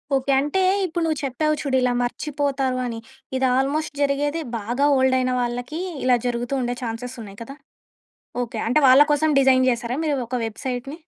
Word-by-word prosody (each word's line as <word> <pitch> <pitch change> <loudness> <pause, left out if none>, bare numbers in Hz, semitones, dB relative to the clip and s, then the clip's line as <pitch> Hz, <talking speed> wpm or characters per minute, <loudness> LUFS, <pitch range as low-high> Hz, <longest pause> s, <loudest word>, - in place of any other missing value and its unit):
Okay. 270 +1 0
అంటే, 295 +7 0 0.2
ఇప్పుడు 345 -1 -2
నువ్వు 315 -2 -1
చెప్పావు 305 +4 0
చూడు 275 -3 -1
ఇలా 250 -1 +2
మర్చిపోతారు 270 -1 -2
అని, 230 -2 -4 0.4
ఇది 260 0 +1
ఆల్మోస్ట్ 290 +3 -1
జరిగేది 290 +3 0 0.2
బాగా 240 +7 -1
ఓల్డయిన 260 -1 +2
వాళ్ళకీ, 245 +6 -3 0.2
ఇలా 250 -1 +4
జరుగుతూ 245 +2 -2
ఉండే 245 0 -2
చాన్సెసున్నాయి 230 -3 -6
కదా! 275 +4 -10 0.9
ఓకే. 230 -1 -5
అంటే, 275 +6 +3
వాళ్ళ 265 +3 +8
కోసం 310 +1 +2
డిజైన్ 260 -1 +4
చేసారా 240 +1 -2
మీరు 295 -3 0
ఒక 255 - -2
వెబ్‌సైట్‌ని? 260 +6 -5
260 Hz, 155 wpm, -22 LUFS, 245-285 Hz, 0.9 s, వాళ్ళ